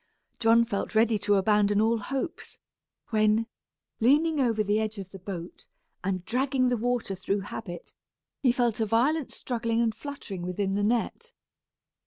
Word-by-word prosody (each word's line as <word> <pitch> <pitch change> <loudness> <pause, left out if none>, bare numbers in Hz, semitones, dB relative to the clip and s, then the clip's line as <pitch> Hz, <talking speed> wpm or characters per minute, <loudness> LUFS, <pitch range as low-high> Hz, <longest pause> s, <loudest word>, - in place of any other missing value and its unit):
John 230 0 +5
felt 200 0 -3
ready 220 -1 +4
to 205 0 +2
abandon 205 +1 +3
all 225 +1 +2
hopes, 270 - -5 0.5
when, 215 +1 +3 0.5
leaning 300 +6 +3
over 230 -5 +2
the 210 +1 +1
edge 215 0 -2
of 190 -1 -7
the 195 - -10
boat, 180 -2 -8 0.4
and 185 -1 -2
dragging 255 +1 +1
the 245 - +2
water 240 -3 -1
through 195 +1 -2
habit, 190 -3 -7 0.5
he 260 -5 +4
felt 240 -3 0
a 220 - +1
violent 265 +7 +1
struggling 230 -2 -2
and 230 -2 +2
fluttering 225 -7 -7
within 190 +2 -2
the 205 - 0
net. 240 - -1
220 Hz, 155 wpm, -27 LUFS, 205-245 Hz, 0.5 s, John